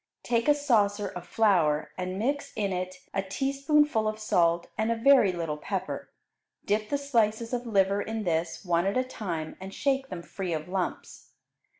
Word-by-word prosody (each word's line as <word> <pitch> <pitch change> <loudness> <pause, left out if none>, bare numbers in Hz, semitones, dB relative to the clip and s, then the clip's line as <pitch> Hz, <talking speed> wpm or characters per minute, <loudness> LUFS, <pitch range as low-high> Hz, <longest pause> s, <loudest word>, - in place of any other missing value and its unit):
Take 235 +1 +1
a 295 - +6
saucer 210 -8 +2
of 180 -1 -8
flour 170 -9 +2
and 185 0 -4
mix 280 +7 -1
in 200 -3 -1
it 185 0 -3 0.2
a 195 - +1
teaspoonful 275 +3 +1
of 215 0 -2
salt 170 -5 +2
and 220 +1 0
a - - +2
very 240 -4 +5
little 165 -4 -3
pepper; - - -4 0.6
dip 210 +1 0
the 285 - +1
slices 230 -4 0
of 245 0 -2
liver 200 -2 +2
in 220 0 -3
this, 165 +1 -1
one 175 +1 +2
at 200 - 0
a 255 - +3
time, 175 -11 -5
and 190 +1 -7
shake 270 +3 0
them 175 -2 -6
free 185 -2 -4
of 155 0 -3
lumps. 185 0 -4
205 Hz, 180 wpm, -28 LUFS, 180-235 Hz, 0.6 s, a